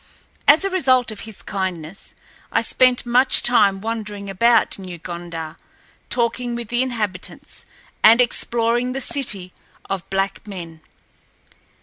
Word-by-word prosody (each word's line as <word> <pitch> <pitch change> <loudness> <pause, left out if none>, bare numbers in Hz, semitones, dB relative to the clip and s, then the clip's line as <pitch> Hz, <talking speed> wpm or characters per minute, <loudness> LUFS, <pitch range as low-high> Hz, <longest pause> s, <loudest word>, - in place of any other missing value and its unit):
As 310 +7 +7
a 390 - -1
result 255 -9 +2
of 215 - -8
his 215 - -10
kindness, 185 -2 -5 0.4
I - - +2
spent 255 -1 +2
much 250 +2 +5
time 200 -5 +3
wandering 210 -3 -5
about 230 +2 +2
New 185 -2 -8
Gondar, 170 -2 -7 0.5
talking 240 0 -1
with 235 -2 -6
the 240 +1 +1
inhabitants, 215 -8 -5 0.4
and 225 +2 +7
exploring 240 0 +2
the 270 - -3
city 200 -11 -1 0.4
of 190 -3 -4
black 195 +2 -2
men. 170 -5 -9
215 Hz, 125 wpm, -20 LUFS, 190-245 Hz, 0.5 s, As